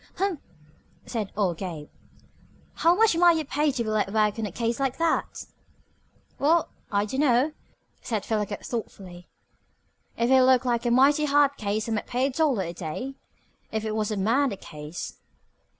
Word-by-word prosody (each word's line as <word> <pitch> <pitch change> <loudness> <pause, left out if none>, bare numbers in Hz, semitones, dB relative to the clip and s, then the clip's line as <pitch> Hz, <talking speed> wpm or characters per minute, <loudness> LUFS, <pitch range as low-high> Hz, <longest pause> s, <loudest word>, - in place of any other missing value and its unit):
"Humph!" 380 -4 -1 0.7
said 220 -5 -4
old 185 -6 0
Gabe. 165 -6 -6 0.9
"How 335 +1 +3
much 445 -3 +4
might 345 -1 +5
you 315 - -2
pay 295 +2 +1
to 255 -3 -2
be 220 - -3
let 210 -2 0
work 215 0 +1
on 220 - -1
a - - -8
case 230 +4 -2
like 270 -2 -1
that?" 330 0 -1 0.9
"Well, 320 +4 +3 0.2
I 205 0 +1
dunno!" 265 +3 +2 0.5
said 220 -5 -3
Philo 215 -2 0
Gubb 205 0 -6
thoughtfully. 185 -6 -7 0.9
"If 235 +2 +1
it 265 0 +7
looked 255 0 +4
like 240 -1 0
a - - +3
mighty 275 +5 +4
hard 285 -1 +3
case 215 -2 -2
I - - -3
might 215 - -2
pay 250 +2 0
a 275 - 0
dollar 270 -7 +1
a 170 -1 -5
day 175 +11 -5 0.6
if 220 0 -2
it 215 - -2
was 215 -1 -1
a 215 - -2
murder 230 +3 +1
case." 150 0 -8
235 Hz, 175 wpm, -26 LUFS, 205-280 Hz, 0.9 s, it